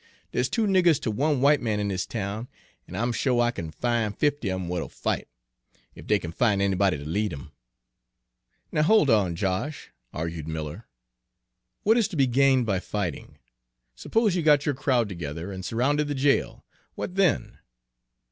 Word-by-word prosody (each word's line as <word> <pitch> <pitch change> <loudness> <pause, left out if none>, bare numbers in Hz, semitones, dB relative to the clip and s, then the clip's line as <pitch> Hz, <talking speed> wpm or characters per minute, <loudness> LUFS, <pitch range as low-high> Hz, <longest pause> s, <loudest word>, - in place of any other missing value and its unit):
Dere's - - 0
two 225 -2 +1
niggers 180 -6 +4
ter 110 - -2
one 140 +4 +1
white 145 +1 +4
man 110 -3 -1
in 100 -1 -1
dis 95 -1 -2
town, 110 +2 -4 0.4
an' 90 - -9
I'm 120 +5 0
sho' 125 0 +1
I 120 0 +3
kin 85 -9 -6
fin' 115 +4 -1
fifty 145 -3 0
of 95 0 -2
'em 90 - -4
w'at 90 -1 -2
'll - - -9
fight, - - -3 0.7
ef - - -12
dey 105 - +4
kin 85 -4 -6
fin' 105 +2 +2
anybody 100 -3 +2
ter 70 - -8
lead 100 +8 -1
'em." 70 -2 -9 1.2
"Now 150 - +1
hold 155 - +4
on, 95 -6 +2
Josh," 95 - -3 0.2
argued 80 -1 -5
Miller; 80 +6 -5 1.0
"what 220 +3 +4
is 225 - +2
to 205 - -8
be 140 -3 +4
gained 130 0 +3
by 100 -4 0
fighting? 95 -4 -4 0.6
Suppose 220 - +1
you 175 - +1
got 150 -2 +4
your 145 - +1
crowd 130 -4 +1
together 85 -1 -6
and 95 -1 -6
surrounded 140 +9 0
the 145 - -2
jail, 140 +1 +1 0.3
what - - -5
then?" 190 -5 +1
115 Hz, 180 wpm, -26 LUFS, 95-145 Hz, 1.2 s, niggers